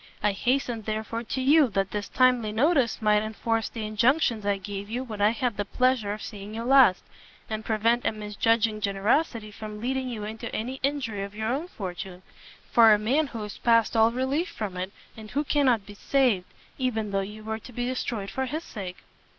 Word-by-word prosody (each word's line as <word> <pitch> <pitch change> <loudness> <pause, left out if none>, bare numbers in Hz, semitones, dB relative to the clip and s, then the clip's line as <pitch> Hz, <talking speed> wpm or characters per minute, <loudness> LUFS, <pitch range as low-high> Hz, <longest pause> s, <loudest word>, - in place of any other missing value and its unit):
I 210 - +4
hastened, 240 +1 -1
therefore, 220 +1 -3
to 260 - -3
you, 290 +1 +6
that 195 -1 +1
this 205 -3 -4
timely 250 -4 +3
notice 250 -1 +2
might 210 0 +4
enforce 225 +1 -1
the 225 -2 -5
injunctions 230 0 +2
I 200 -1 +2
gave 200 +1 -6
you 245 +3 -2
when 215 -5 -6
I 205 - +6
had 235 -1 -1
the 205 - 0
pleasure 255 -3 +1
of 210 +1 -5
seeing 205 0 -8
you 230 - -3
last, 255 -6 +5 0.5
and 215 0 -3
prevent 230 +2 +1
a - - +2
misjudging 215 +1 0
generosity 210 +3 0
from 210 0 -8
leading 260 +2 -2
you 220 -4 -5
into 225 +2 -6
any 250 +5 -3
injury 265 -7 -1
of 200 +1 -8
your 220 +1 -2
own 285 +8 -1
fortune, 185 - -7 0.5
for 230 -2 +7
a 210 - +6
man 265 +9 +1
who 230 -5 -6
is 210 - -8
past 230 -2 +3
all 225 0 +5
relief 265 +8 -1
from 205 -4 -5
it, 185 +1 -4 0.2
and 220 -1 -10
who 290 +6 0
cannot 260 -8 +2
be 205 - -10
saved, 225 -4 +1 0.3
even 220 -5 -1
though 195 - +1
you 210 +2 -7
were 220 0 -3
to 250 - -12
be 245 +1 -3
destroyed 235 -5 -3
for 265 0 -2
his 310 +5 -4
sake." 185 - -8
220 Hz, 200 wpm, -26 LUFS, 210-255 Hz, 0.5 s, for